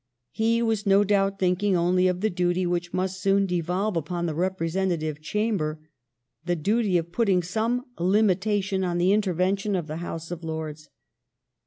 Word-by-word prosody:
He 230 Hz, +1 st, +1 dB
was 220 Hz, -2 st, 0 dB
no 200 Hz, +1 st, +5 dB
doubt 195 Hz, -1 st, +1 dB
think 180 Hz, -1 st, +1 dB
ing 200 Hz, -3 st, +2 dB
only 180 Hz, +2 st, +3 dB
of 180 Hz, 0 st, -1 dB
the 215 Hz, -, +1 dB
duty 180 Hz, 0 st, 0 dB
which 175 Hz, 0 st, -2 dB
must 185 Hz, 0 st, -2 dB
soon 195 Hz, 0 st, +3 dB
devolve 180 Hz, +3 st, -1 dB
upon 170 Hz, +2 st, -2 dB
the 165 Hz, -, -1 dB
Representative 165 Hz, -2 st, -1 dB
Chamber 180 Hz, -5 st, -1 dB, 0.3 s
— 125 Hz, +5 st, -56 dB
the 175 Hz, -, +2 dB
duty 200 Hz, +3 st, +1 dB
of 170 Hz, 0 st, -3 dB
putting 190 Hz, -3 st, +2 dB
some 225 Hz, +7 st, -1 dB
limitation 195 Hz, +1 st, +1 dB
on 175 Hz, -1 st, -1 dB
the 180 Hz, +2 st, +3 dB
intervention 195 Hz, 0 st, +1 dB
of 175 Hz, -4 st, -2 dB
the 155 Hz, +1 st, -5 dB
House 165 Hz, -1 st, -6 dB
of 175 Hz, -1 st, -6 dB
Lords. 160 Hz, -1 st, -5 dB
185 Hz, 170 wpm, -25 LUFS, 170-200 Hz, 0.3 s, no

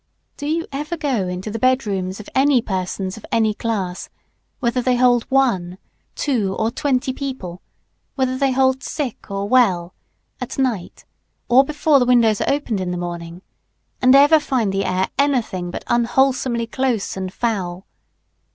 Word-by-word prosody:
] -, -, -49 dB
Do 290 Hz, -, -5 dB
you 330 Hz, +2 st, 0 dB
ever 300 Hz, +5 st, -4 dB
go 265 Hz, -, -1 dB
into 180 Hz, +4 st, -5 dB
the 225 Hz, -, -4 dB
bed 255 Hz, +2 st, +2 dB
rooms 190 Hz, -1 st, -3 dB
of 210 Hz, -, -10 dB
any 270 Hz, 0 st, +4 dB
persons 190 Hz, -2 st, -3 dB
of 220 Hz, -, -11 dB
any 220 Hz, -2 st, +2 dB
class, 200 Hz, -5 st, -3 dB, 0.5 s
whether 250 Hz, -1 st, 0 dB
they 250 Hz, 0 st, +1 dB
contain 245 Hz, -1 st, +4 dB
one, 195 Hz, -10 st, +1 dB, 0.4 s
two, 215 Hz, -9 st, 0 dB
or 220 Hz, +1 st, 0 dB
twenty 260 Hz, 0 st, 0 dB
people, 255 Hz, -11 st, -6 dB, 0.5 s
whether 260 Hz, -1 st, 0 dB
they 270 Hz, 0 st, +1 dB
hold 260 Hz, 0 st, +2 dB
sick 285 Hz, -7 st, -5 dB
or 200 Hz, 0 st, -3 dB
well, 195 Hz, -8 st, +2 dB, 0.5 s
at -, -, -5 dB
night, 240 Hz, -9 st, -2 dB, 0.4 s
or 255 Hz, +3 st, +7 dB
before 295 Hz, 0 st, +2 dB
the 250 Hz, -, +2 dB
windows 230 Hz, -4 st, +4 dB
are -, -, +1 dB
opened 265 Hz, -8 st, -1 dB
in 185 Hz, -, -3 dB
the 180 Hz, -, -3 dB
morning, 175 Hz, 0 st, -6 dB, 0.6 s
and 255 Hz, +1 st, +6 dB
ever 290 Hz, +3 st, +7 dB
find 240 Hz, -9 st, -1 dB
the 195 Hz, 0 st, 0 dB
air 185 Hz, 0 st, 0 dB
anything 235 Hz, -11 st, 0 dB
but -, -, -6 dB
unwholesomely 240 Hz, 0 st, +1 dB
close 245 Hz, -3 st, -1 dB
and 190 Hz, -1 st, -4 dB
foul? 190 Hz, -5 st, -3 dB
235 Hz, 165 wpm, -20 LUFS, 190-265 Hz, 0.6 s, or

